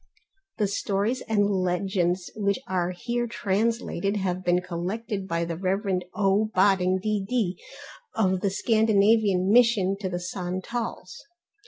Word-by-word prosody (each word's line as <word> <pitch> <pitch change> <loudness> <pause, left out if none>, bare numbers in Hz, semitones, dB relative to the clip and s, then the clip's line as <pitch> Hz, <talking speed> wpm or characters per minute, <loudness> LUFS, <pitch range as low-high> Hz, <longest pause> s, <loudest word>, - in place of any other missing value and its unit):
The 210 - +1
stories 200 +5 -1
and 205 -2 +3
legends 185 -1 0
which 200 -2 0
are 180 -2 0
here 240 +6 -2
translated 210 -2 -1
have 185 -2 -2
been 180 0 +2
collected 195 +4 -4
by 170 -1 -1
the 170 0 -4
Rev. 190 +2 0 0.2
O. 205 +1 +2
Bodding, 185 -1 +3
D.D. 205 -1 -1 0.5
of 190 -3 +1
the 200 - +1
Scandinavian 210 -2 +3
Mission 225 -5 +4
to 190 -2 -3
the 175 -1 -3
Santals. 185 - -5
195 Hz, 125 wpm, -26 LUFS, 185-215 Hz, 0.5 s, Mission